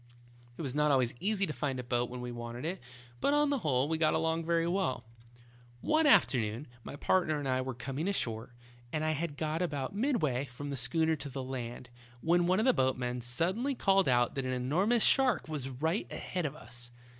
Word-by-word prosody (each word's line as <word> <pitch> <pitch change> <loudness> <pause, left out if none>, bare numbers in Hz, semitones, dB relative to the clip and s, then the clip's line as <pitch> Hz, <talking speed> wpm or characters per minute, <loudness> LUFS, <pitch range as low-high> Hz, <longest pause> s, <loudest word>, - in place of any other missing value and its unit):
It - - -5
was 135 -3 -3
not 150 +1 +2
always 130 -4 +2
easy 200 0 +1
to 155 - -4
find 135 -4 -2
a - - -4
boat 120 0 0
when 125 0 -6
we 125 0 -5
wanted 120 +2 -6
it, 180 +3 -3 0.4
but 285 - +2
on 295 -1 +3
the 280 - +1
whole, 140 - +1
we 160 0 -1
got 155 -1 +3
along 165 0 0
very 165 0 +2
well. 170 -8 0 0.8
"One 310 0 +3
afternoon 120 - +3 0.2
my - - -7
partner 155 0 +1
and 145 -2 -3
I 130 0 +1
were 130 -1 -4
coming 135 +7 -4
ashore, 120 - -2 0.4
and 155 -1 -1
had 155 -1 -1
got 155 +2 -1
about 145 -5 -2
midway 165 - 0
from 140 +2 -7
the - - -2
schooner 160 +6 +1
to 140 0 -6
the 135 0 -5
land, 125 -1 -6 0.3
when 175 +1 +3
one 185 +1 +3
of 220 - +2
the 260 - +5
boatmen 125 - 0
suddenly 185 - 0
called 195 - +3
out 120 -1 +3
that 135 -1 -3
an 130 - -1
enormous 180 - +2
shark 260 -8 +4
was 145 -4 -4
right 160 - -2
ahead 180 -4 -2
of 140 - -7
us. 120 -5 -11
150 Hz, 205 wpm, -31 LUFS, 125-175 Hz, 0.8 s, the